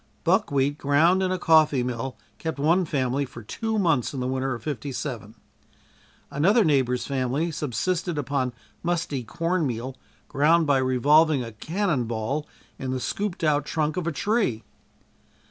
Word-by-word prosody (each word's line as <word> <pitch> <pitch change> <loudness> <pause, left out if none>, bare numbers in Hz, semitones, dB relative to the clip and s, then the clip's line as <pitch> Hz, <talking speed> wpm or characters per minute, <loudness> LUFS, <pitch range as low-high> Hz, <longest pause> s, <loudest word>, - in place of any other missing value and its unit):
Buckwheat 145 -7 +1
ground 160 +7 +3
in 185 -1 0
a 185 - 0
coffee 155 -6 +4
mill 125 0 -4 0.2
kept 160 -2 -3
one 165 +6 +3
family 135 -2 0
for 125 -3 -9
two 220 - -3
months 160 - +1
in - - -3
the 125 - -2
winter 130 0 -1
of 115 - -10
'57. 125 -5 -5 1.0
Another 195 - +4
neighbor's 125 -5 +1
family 140 +5 -1
subsisted 165 +4 -2
upon 140 -2 -1 0.3
musty 170 -6 -1
corn 165 +6 -1
meal, 125 +2 -4 0.3
ground 155 +4 +3
by 140 -2 +3
revolving 140 +3 +4
a 115 - -7
cannon 155 - -1
ball 115 +7 -3 0.3
in 130 - -4
the 130 0 -1
scooped 200 +6 -3
out 150 -2 +2
trunk 155 0 -1
of 180 -2 -2
a - - +1
tree. 200 - 0
145 Hz, 150 wpm, -25 LUFS, 130-165 Hz, 1.0 s, coffee